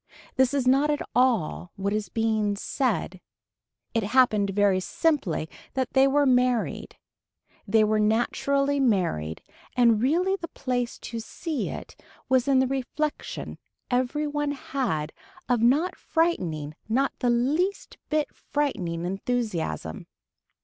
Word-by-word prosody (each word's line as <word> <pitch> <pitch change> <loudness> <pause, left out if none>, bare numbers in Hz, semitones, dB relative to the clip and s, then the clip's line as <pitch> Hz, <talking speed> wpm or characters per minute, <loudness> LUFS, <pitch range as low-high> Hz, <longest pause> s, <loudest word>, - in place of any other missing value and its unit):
This 260 -1 +3
is 265 -3 +1
not 275 +3 +4
at 295 -1 0
all 230 -8 +1
what 200 +1 -2
is 215 -1 -2
being 220 -2 0
said. 205 -4 -2 0.7
It 225 - +2
happened 215 -2 +3
very 195 -1 +3
simply 200 - 0 0.3
that 260 -2 -1
they 265 0 +5
were 285 +1 +3
married. 250 -2 +1 0.7
They 215 +2 +4
were 215 0 +2
naturally 275 +6 +1
married 175 - 0 0.3
and 230 -3 +5
really 350 +9 +2
the 335 - -6
place 245 -5 -2
to 230 - -5
see 305 +6 -4
it - - -8 0.3
was 260 0 +2
in 275 -1 +4
the 260 - +4
reflection 270 +3 -3 0.3
every 255 +4 +1
one 295 -1 -1
had 240 - -2 0.3
of 245 -3 +2
not 295 +10 +3
frightening 170 - -1 0.2
not 270 +5 +1
the 245 - +1
least 295 +12 0
bit 305 -2 0
frightening 180 - -2
enthusiasm. 195 - -3
245 Hz, 130 wpm, -26 LUFS, 210-280 Hz, 0.7 s, they